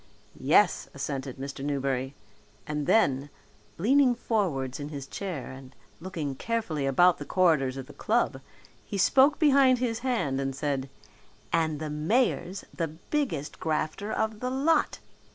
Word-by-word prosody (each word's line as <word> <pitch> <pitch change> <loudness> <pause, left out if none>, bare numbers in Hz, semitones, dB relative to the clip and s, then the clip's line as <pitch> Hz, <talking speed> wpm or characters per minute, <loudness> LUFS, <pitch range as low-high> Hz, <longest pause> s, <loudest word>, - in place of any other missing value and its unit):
"Yes," - - +3
assented 135 -2 -4
Mr. 135 0 -6
Newberry, 135 -1 -1 0.5
and 150 -1 -3
then, 140 -10 +3 0.5
leaning 255 +6 +4
forwards 165 - -1
in 145 0 -5
his 140 -3 -6
chair 175 -4 -5
and 130 0 -12 0.2
looking 165 -5 -4
carefully 160 - -2
about 175 +6 +4
the - - -4
corridors 150 -8 +2
of 135 - -6
the - - -13
club, 215 - 0 0.4
he 200 - -5
spoke 270 +9 +5
behind 275 -4 +5
his 235 -2 -1
hand 225 - -1
and 135 -1 -2
said, 140 -2 -2 0.6
"And 160 -2 +1
the 155 -1 -4
mayor's 185 +3 0
the 165 - -1
biggest 160 - -3
grafter 160 +6 -2
of 220 -1 -1
the 250 - -2
lot. 290 +5 +2
160 Hz, 140 wpm, -28 LUFS, 140-225 Hz, 0.6 s, spoke